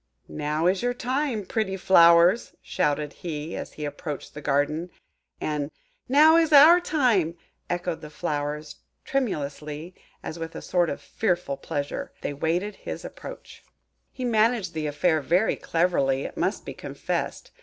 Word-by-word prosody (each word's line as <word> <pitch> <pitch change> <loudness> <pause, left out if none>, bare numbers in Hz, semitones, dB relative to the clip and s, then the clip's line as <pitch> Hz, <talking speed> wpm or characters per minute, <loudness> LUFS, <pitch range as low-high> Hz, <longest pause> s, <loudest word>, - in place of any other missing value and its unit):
"Now 150 +2 -2
is 185 +2 +2
your 245 0 0
time, 250 -3 -1
pretty 205 -3 -1
flowers!" 170 +2 +5
shouted 150 0 -1
he, 160 -1 -5
as - - -6
he 150 - -5
approached 145 0 -6
the 150 - -8
garden; 150 +4 0 0.5
and 150 -2 -2 0.4
"Now 310 +4 +7
is 325 -2 +3
our 310 +4 +9
time!" 230 - +1 0.3
echoed 175 -1 -2
the 150 - -9
flowers 150 -1 -4 0.3
tremulously, 155 - -3 0.3
as, 165 - -6
with 165 0 -6
a - - -6
sort 175 -2 +1
of - - -5
fearful 175 -9 -1
pleasure, 140 +1 -4
they - - -2
awaited 170 +8 -1
his - - -7
approach. - - -10 0.5
He 255 - -5
managed 220 -5 +2
the 155 -1 -2
affair 155 +2 +1
very 180 +9 +2
cleverly, 140 -6 +1
it - - -6
must - - -1
be - - -6
confessed. - - -4
170 Hz, 145 wpm, -25 LUFS, 150-215 Hz, 0.5 s, our